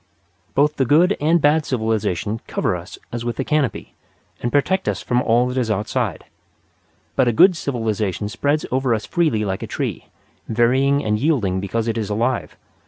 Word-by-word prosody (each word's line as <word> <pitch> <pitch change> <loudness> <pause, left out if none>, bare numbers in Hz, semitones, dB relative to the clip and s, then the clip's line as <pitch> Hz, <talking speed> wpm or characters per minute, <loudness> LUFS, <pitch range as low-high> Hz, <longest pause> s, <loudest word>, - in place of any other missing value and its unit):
Both 150 +2 +2
the 135 - +2
good 170 - +4
and 165 +3 +3
bad 155 +1 +3
civilization 110 - -1
cover - - -1
us 90 +1 -8
as 120 0 -4
with 120 0 -4
a - - +1
canopy, 150 -2 -1 0.5
and 120 - -1
protect 190 +7 +1
us - - -2
from 125 -1 +1
all 120 0 +3
that 125 +1 -1
is 120 -3 -1
outside. 105 0 -2 0.9
But 130 - +3
a - - +4
good 180 - +6
civilization 110 - -2
spreads 145 +8 0
over 130 -2 +1
us 110 - -5
freely 155 -12 +1
like 95 -1 -3
a - - -5
tree, - - -4 0.4
varying 130 +5 +2
and 105 0 +1
yielding 115 - +1
because 110 +4 -2
it 115 0 -1
is 105 -2 -3
alive. 120 +4 -1
120 Hz, 175 wpm, -21 LUFS, 110-145 Hz, 0.9 s, good